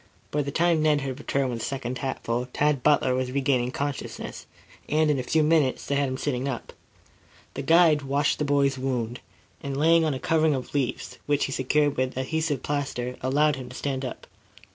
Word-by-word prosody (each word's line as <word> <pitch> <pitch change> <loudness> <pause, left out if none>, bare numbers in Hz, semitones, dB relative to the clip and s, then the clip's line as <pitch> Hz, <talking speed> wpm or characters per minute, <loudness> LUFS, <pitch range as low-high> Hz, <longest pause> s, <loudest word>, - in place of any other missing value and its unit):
By 150 - +1
the 140 - -3
time 165 +2 +2
Ned 150 -2 +3
had 135 0 -4
returned 140 -3 -1
with 115 - -4
the - - -3
second 130 -2 -4
hatful, 125 -2 -2
Tad 150 -2 +1
Butler 145 -2 +3
was 130 0 -1
regaining 130 -2 +1
consciousness, 140 +1 -5 0.4
and 155 0 +3
in 140 - 0
a - - 0
few 155 +5 +2
moments 150 -4 +2
they - - -2
had 140 -1 +1
him 130 - -3
sitting 135 -2 -2
up. 130 -4 -5 0.8
The 140 - -4
guide 160 0 +5
washed 140 +1 0
the - - +1
boy's 140 -1 +2
wound, 125 -2 -2 0.4
and, 140 -1 -4
laying 165 +3 +4
on 155 -3 0
a - - -5
covering 160 -1 +2
of 130 - -6
leaves, 140 -4 -2
which 145 -1 +2
he - - -5
secured 145 +2 +1
with 130 0 -1
adhesive 150 +1 -1
plaster, 130 -4 -2
allowed 145 +3 +2
him 130 -2 -8
to 125 - -10
stand 135 -2 -2
up. 130 - -6
140 Hz, 200 wpm, -26 LUFS, 130-150 Hz, 0.8 s, guide